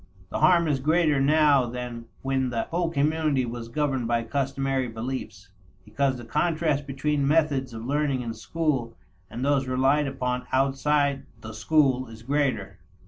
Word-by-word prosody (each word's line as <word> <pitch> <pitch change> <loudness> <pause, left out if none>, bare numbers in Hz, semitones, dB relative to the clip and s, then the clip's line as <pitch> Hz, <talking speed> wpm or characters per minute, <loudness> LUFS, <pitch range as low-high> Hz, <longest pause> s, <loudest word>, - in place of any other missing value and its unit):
The - - -2
harm 170 -2 +5
is 145 -3 +1
greater 155 0 +2
now 145 -2 +4
than 120 -1 -6 0.2
when 135 -1 0
the 120 -2 -1
whole 170 0 -1
community 150 -3 +1
was 120 -1 -6
governed 135 -1 -1
by 120 0 +1
customary 135 0 -1
beliefs, 115 -5 -6 0.4
because 130 +5 0
the 120 - -9
contrast 150 +1 0
between 140 +1 0
methods 145 -4 +2
of 115 0 -7
learning 140 -1 0
in 115 -1 -4
school 130 -1 -2 0.3
and 125 +3 -4
those 140 -2 +2
relied 135 +3 +2
upon 125 -2 -3
outside 140 +1 +1
the 110 -1 -8
school 130 +1 +2
is 115 0 -12
greater. 140 +1 -1
135 Hz, 150 wpm, -26 LUFS, 125-150 Hz, 0.4 s, harm